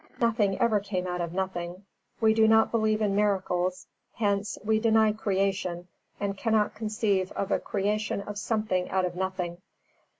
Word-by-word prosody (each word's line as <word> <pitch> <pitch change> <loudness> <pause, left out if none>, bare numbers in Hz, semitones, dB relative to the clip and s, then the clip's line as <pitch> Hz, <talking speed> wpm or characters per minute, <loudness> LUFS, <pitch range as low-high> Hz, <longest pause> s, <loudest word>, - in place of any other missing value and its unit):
Nothing 220 -4 +2
ever 230 -4 +3
came 195 -2 -3
out 180 -1 -2
of 170 -1 -3
nothing. 185 0 -4 0.3
We 220 -2 +4
do 220 0 +4
not 220 0 +5
believe 220 -1 +1
in 200 -2 +1
miracles; 185 -3 0 0.3
hence 205 -1 0
we 220 0 +3
deny 220 -1 +4
creation, 190 -4 -1 0.3
and 200 -1 -2
cannot 215 +1 +1
conceive 210 -3 -1
of 200 0 -3
a - - +2
creation 210 +1 -1
of 205 0 -6
something 215 -5 -1
out 190 -1 +1
of 175 -1 -4
nothing. 185 -2 -3
200 Hz, 160 wpm, -28 LUFS, 185-215 Hz, 0.3 s, not